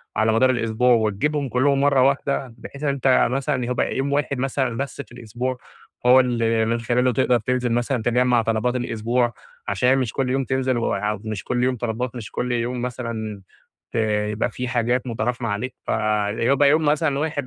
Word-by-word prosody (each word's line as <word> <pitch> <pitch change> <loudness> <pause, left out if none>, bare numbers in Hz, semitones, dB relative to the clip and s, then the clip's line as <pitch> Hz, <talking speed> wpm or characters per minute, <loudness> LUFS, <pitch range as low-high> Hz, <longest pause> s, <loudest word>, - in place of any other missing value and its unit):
على 110 0 +2
مدار 130 +3 +4
الأسبوع، 120 0 +2
وتجيبهم 125 +6 0
كلّهم 135 +3 +2
مرَّة 140 -2 +4
واحدة، 135 -1 0
بحيث 140 +1 -10
إن 145 - +1
أنتَ 135 -2 +3
مثلًا 135 +2 0
هو - - -2
يبقى - - -1
يوم 140 +1 -1
واحد 140 -2 0
مثلًا 130 -2 -1
بس 140 +1 -4
في - - -15
الأسبوع، 120 +2 -4 0.5
هو 125 +1 +7
اللي 115 -3 +1
من 115 +1 0
خلاله 125 +2 +1
تقدَر 125 0 +2
تنزل 125 +1 -1
مثلًا 120 +1 0
تجمع 125 0 +3
طلبات 115 +2 0
الأسبوع، 120 0 0 0.3
عشان 125 +7 +2
مش 125 -5 -1
كل 130 -2 -1
يوم 135 +1 +1
تنزل 130 -1 0
و 115 - 0
أو 105 0 -2
ومش 110 -3 -4
كل 125 0 -1
يوم 130 0 +1
طلبات، 120 +2 -3
ومش 115 -4 -7
كل 125 0 -2
يوم 120 +1 -1
مثلًا 115 -4 -5 0.5
ت - - -29 0.4
يبقى 105 +3 -1
في 125 +2 -5
حاجات 120 +1 0
متراكمة 120 +1 -2
عليك. 110 +6 -3
فيبقى 110 +6 +1
يوم 155 +1 +3
مثلًا 145 -1 +1
واحد 145 -3 -2
125 Hz, 185 wpm, -22 LUFS, 115-130 Hz, 0.5 s, هو